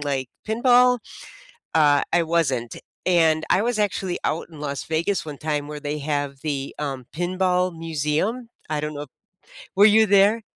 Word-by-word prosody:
like 135 -3 -2 0.2
pinball, 245 +2 +4 0.8
uh, 145 -2 +4
I 175 - +4
wasn't. 135 -8 0 0.3
And 160 -3 +3
I 190 - +4
was 235 -1 -1
actually 195 -3 -1
out 160 - -2
in 160 - -12
Las 140 -2 -4
Vegas 165 +5 -1
one 145 -2 -7
time 150 -2 -2
where 150 0 -6
they 145 +1 -3
have 145 -2 -3
the, 140 -3 -3
um, 135 -4 -4
pinball 180 +1 0
museum, 165 - -2 0.2
I 150 -1 -1
don't 150 0 -4
know 145 - -5
i 150 - -8 0.7
Were 200 - +7
you 220 +1 +6
there? 205 +3 +4
160 Hz, 165 wpm, -23 LUFS, 145-195 Hz, 0.8 s, Were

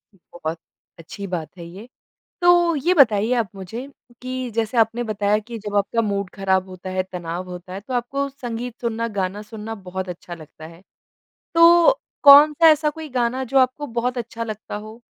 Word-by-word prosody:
बहुत 170 -3 -7 0.4
अच्छी 185 +4 -8
बात 175 -1 -5
है 170 - -9
ये। 190 +7 -11 0.5
तो 350 -1 +4
ये 340 +6 +1
बताइए 225 - +4
आप 230 -4 0
मुझे 195 +7 -7 0.4
कि 255 -1 -4
जैसे 225 +1 -1
आपने 225 +1 +2
बताया 210 -1 0
कि 230 +2 -8
जब 205 0 -2
आपका 205 +3 +1
मूड 200 -3 -2
ख़राब 190 -1 0
होता 185 0 -8
है 185 0 0
तनाव 175 0 -5
होता 180 +1 -9
है 190 - -6
तो 255 +6 -7
आपको 275 +3 -1
संगीत 245 -3 -6
सुनना 230 -1 -2
गाना 190 +2 -2
सुनना 220 +1 -7
बहुत 190 +1 -4
अच्छा 175 0 -8
लगता 160 -1 -13
है। 165 +2 -15 0.7
तो 335 +4 +7 0.3
कौन-सा 300 +3 +8
ऐसा 305 0 +2
कोई 315 +1 -9
गाना 255 0 -1
जो 270 +2 +1
आपको 260 +3 +1
बहुत 250 +1 -1
अच्छा 230 0 -5
लगता 215 -2 -6
हो 215 +2 -10
225 Hz, 180 wpm, -22 LUFS, 190-255 Hz, 0.7 s, कौन-सा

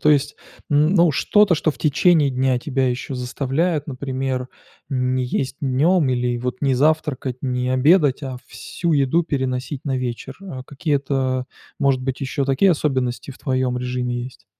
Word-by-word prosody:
то 150 - +4
есть, 145 0 +2 0.4
м, 150 +4 +3
ну, 170 -4 +5
что-то, 205 +6 +4
что 160 0 +1
в - - -10
течение 150 -1 +3
дня 130 -1 +1
тебя 130 -1 0
еще 125 +2 -3
заставляет, 140 +5 -1
например, 130 -2 -3 0.4
не 130 -1 0
есть 130 +2 -2
днём 145 +4 +2
или 125 -1 0
вот 125 +1 -3
не 135 -2 +2
завтракать, 145 -3 +1
не 125 -1 -1
обедать, 145 +1 +4
а 130 -2 -5
всю 170 -1 -3
еду 145 +3 +3
переносить 130 -2 -3
на 135 -2 -1
вечер. 125 +1 -4
А, 135 -10 -7
какие-то, 135 -3 -1 0.3
может 135 -2 +2
быть, 130 0 -3
ещё 140 +1 -1
такие 140 +8 +3
особенности 130 -4 -1
в 130 - -12
твоем 130 -2 -1
режиме 125 -1 -2
есть? 130 - -12
135 Hz, 160 wpm, -21 LUFS, 125-150 Hz, 0.4 s, ну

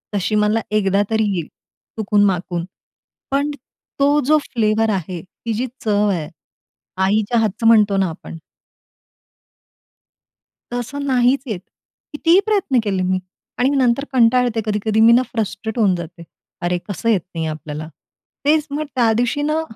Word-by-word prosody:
तशी 205 +2 0
मला 210 +1 +2
एकदा 200 -2 +2
तरी 220 0 +1
येईल 170 -4 -3 0.5
चुकून-माकून. 195 -5 +1 0.7
पण 285 +2 +1 0.5
तो 285 +1 +4
जो 310 +3 +5
फ्लेवर 220 -1 +1
आहे, 180 -2 -4
ती 225 +6 -7
जी 245 +4 -2 0.2
चव 210 -1 +2
आहे, 165 -6 -2 0.7
आईच्या 210 +4 +1
हातचं 225 +1 0
म्हणतो 210 -3 +5
ना, 190 -2 +1
आपण 165 0 -9 2.4
तसं 250 +4 -4
नाहीचं 255 0 +2
येत. 205 -5 -3 0.5
कितीही 330 +5 +4
प्रयत्न 395 - +1
केले 195 -3 -1
मी 185 0 0 0.4
आणि 250 +2 +3
नंतर 270 -2 +2
कंटाळते, 245 -1 +3
कधी-कधी 215 0 0
मी 225 +1 +7
ना, 245 - +5
फ्रस्ट्रेट 220 0 -3
होऊन 200 -4 +3
जाते. 170 0 -8 0.4
अरे, 175 0 0
कसं 215 +4 -2
येत 205 -5 +3
नाही 165 -1 -2
आपल्याला. 155 0 -6 0.6
तेचं 300 -1 +2
मग 305 +1 -2
त्या 235 -3 +3
दिवशी 245 +5 0
ना, 305 +2 0
220 Hz, 140 wpm, -19 LUFS, 195-250 Hz, 2.4 s, मी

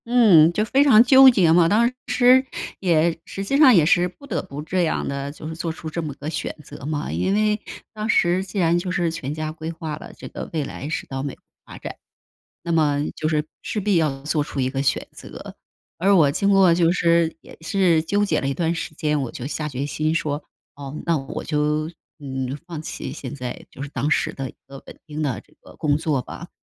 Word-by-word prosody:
嗯， 210 -10 +6
就 210 +5 0
非 270 +5 +3
常 235 -6 +7
纠 265 +1 +8
结 190 -10 +4
嘛， 170 -1 +5
当 235 +5 +3 0.2
时 250 +1 +5 0.4
也 170 -2 +2
实 195 - -6
际 235 +8 -1
上 275 -5 +7
也 165 -5 +5
是 175 +2 +3
不 185 +10 -14
得 280 - -2
不 145 -6 -9
这 180 +3 0
样 160 - -1
的， 140 0 -4
就 155 +1 -9
是 160 - -6
做 165 0 -3
出 160 0 -7
这 170 - -3
么 155 -2 -4
个 145 - -8
选 155 - -3
择 140 - -12
嘛。 150 -1 -3
因 85 - 0
为 210 0 +1 0.3
当 215 +1 -4
时 180 -2 +3
既 195 +2 -8
然 170 -2 +3
就 180 +1 -4
是 175 -2 0
全 140 -4 -5
家 155 0 -4
规 160 0 -6
划 160 -2 -5
了， - - -10
这 - - -9
个 - - -7
未 155 -2 0
来 140 +1 -6
是 160 - -3
到 135 0 -5
美 140 -1 -5
国 - - -38 0.2
发 - - -11
展。 - - -8 0.6
那 170 - -4
么 150 -3 +2
就 155 - -2
是 155 -1 +1 0.2
势 215 - -3
必 205 -1 +1
要 150 -5 +1
做 150 +1 0
出 145 - -6
一 130 -1 +1
个 135 +1 -2
选 - - 0
择。 - - -11 0.4
而 195 +3 +3
我 155 -6 +5
经 200 +7 0
过 195 -3 +5
就 170 -1 +3
是 170 -2 +2
也 - - -14
是 170 -2 +2
纠 205 +5 +1
结 205 - +1
了 135 - -2
一 135 - 0
段 165 +2 -1
时 165 - -5
间， 150 -1 -1
我 125 - -5
就 125 - -6
下 150 +1 -3
决 140 -1 -4
心 155 +2 -1
说：” 150 -2 -2 0.3
哦， 140 0 -8
那 165 -1 +3
我 135 -1 -6
就， 150 0 0 0.3
嗯， 135 -2 -4
放 170 -3 -6
弃， 130 - -6
现 140 -2 -7
在 125 -3 -6
就 - - -11
是 140 - -5
当 145 +1 -2
时 - - +1
的 135 -1 -5
一 - - -34
个 135 0 -11
稳 - - -11
定 155 0 -4
的 135 -6 -2
这 - - -28
个 - - -16
工 145 -1 +1
作 155 -4 0
吧。 - - -10
160 Hz, 250 characters per minute, -22 LUFS, 145-185 Hz, 0.6 s, 纠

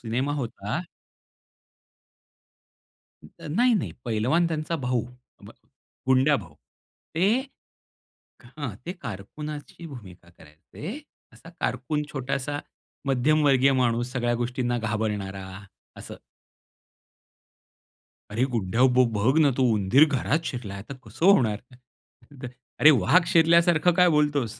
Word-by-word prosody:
Cinema 125 +5 -2
होता. 120 - -4 2.4
तर - - -12
नाही, 240 +9 +3
नाही. 195 - -2
पैलवान 125 +10 +1
त्यांचा 160 +1 -2
भाऊ. 125 -4 -1 0.4
भ - - -12 0.6
गुंड्याभाऊ. 130 - +2 0.6
ते 175 +4 +2 1.2
हां, 125 -3 -7
ते 180 - -3
कारकुनाची 150 - -8
भूमिका 95 - -12
करायचे. 100 - -10 0.3
असा - - -16
कारकून 150 +5 -2
छोटासा 140 +1 -3 0.5
मध्यमवर्गीय 140 0 +3
माणूस 120 -1 0
सगळ्या 120 -2 0
गोष्टींना 120 0 -2
घाबरणारा, 105 -4 -3 0.5
असं. - - -10 2.1
अरे 115 +5 0
गुंड्या 115 +1 0
भाऊ 130 0 +5
बघ 115 +8 +2
ना 145 -3 +5
तो 130 - +1
उंदीर 105 +8 +5
घरात 150 +3 -1
शिरला 105 -6 -5
तर 140 - -6
कसं 110 - -2
होणार? 120 - +4 1.2
अरे! 155 - +9
वाघ 175 - +4
शिरल्यासारखं 170 +1 +4
काय 180 0 +5
बोलतोस? 145 -7 0
130 Hz, 100 wpm, -25 LUFS, 115-155 Hz, 2.4 s, अरे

